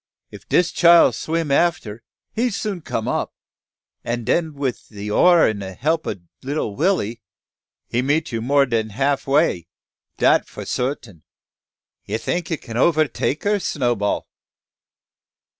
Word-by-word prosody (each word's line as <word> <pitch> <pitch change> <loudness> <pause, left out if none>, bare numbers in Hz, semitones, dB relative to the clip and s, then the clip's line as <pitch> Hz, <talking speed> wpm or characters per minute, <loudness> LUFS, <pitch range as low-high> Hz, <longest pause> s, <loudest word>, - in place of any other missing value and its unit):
If - - -13
dis 175 -1 +3
child 170 -1 +6
swim 160 -2 -2
affer, 140 -9 +1 0.3
he 245 +3 +1
soon 200 -4 -4
come 115 -7 -3
up; - - -2 0.7
and 120 0 -3
den 160 +2 0
wif 135 -3 -3
de 105 -1 -7
oar 175 +8 +5
an' 110 -2 -2
de 95 -1 -6
help 160 - -1
ob 95 -4 -5 0.2
lilly 135 -6 -3
Willy, 130 - 0 0.7
he 120 - 0
meet 145 +4 0
you 115 -1 -2
more 140 +4 +3
dan 115 -3 -1
half 135 +7 -1
way, 135 - +2 0.5
dat - - +3
fo' - - -8
sartin." 125 - -4 0.8
"You 105 - -2
think 170 +8 -3
you 165 - -1
can 115 -4 -8
overtake 155 0 +1
her, 205 0 +1
Snowball?" 120 - -1
140 Hz, 140 wpm, -21 LUFS, 115-165 Hz, 0.8 s, child